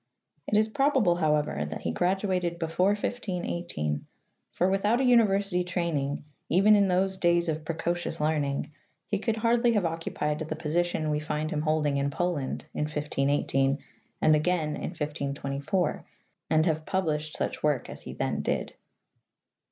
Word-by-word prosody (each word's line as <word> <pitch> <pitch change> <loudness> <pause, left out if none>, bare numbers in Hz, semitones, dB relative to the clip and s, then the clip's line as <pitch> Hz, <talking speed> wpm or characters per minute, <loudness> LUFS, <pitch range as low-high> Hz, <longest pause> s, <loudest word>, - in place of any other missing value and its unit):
'' 150 -1 -45
It 210 - +4
is 215 0 +4
probable, 260 -7 +2
however, 150 - +1
that 75 - -5
he 85 - -1
graduated 180 - 0
before 170 +4 +2
1518, 175 - -3 0.4
for 180 - +1
without 205 +5 +2
a - - +2
university 200 -7 +3
training, 170 -6 -1 0.3
even 195 +5 +6
in 200 -1 +4
those 190 +1 +1
days 170 0 +3
of 155 -1 -2
precocious 165 +1 -2
learning, 150 -2 0 0.3
he 205 - -1
could 225 +1 0
hardly 235 +1 +3
have 205 -5 +2
occupied 160 -2 -2
the 155 0 -3
position 160 0 0
we 150 - +1
find 155 +1 -2
him 150 - -1
holding 155 -2 +1
in 140 0 +1
Poland 145 -2 -2
in 150 - -1
1518 140 -2 +1 0.5
and 155 0 +6
again 155 0 +1
in 150 - -3
1524, 145 +1 -2 0.5
and 155 0 +3
have 160 -2 0
published 155 -5 -1
such - - -2
work 150 -5 +1
as - - -9
he - - -8
then - - -1
did. - - -2
165 Hz, 150 wpm, -28 LUFS, 150-190 Hz, 0.5 s, even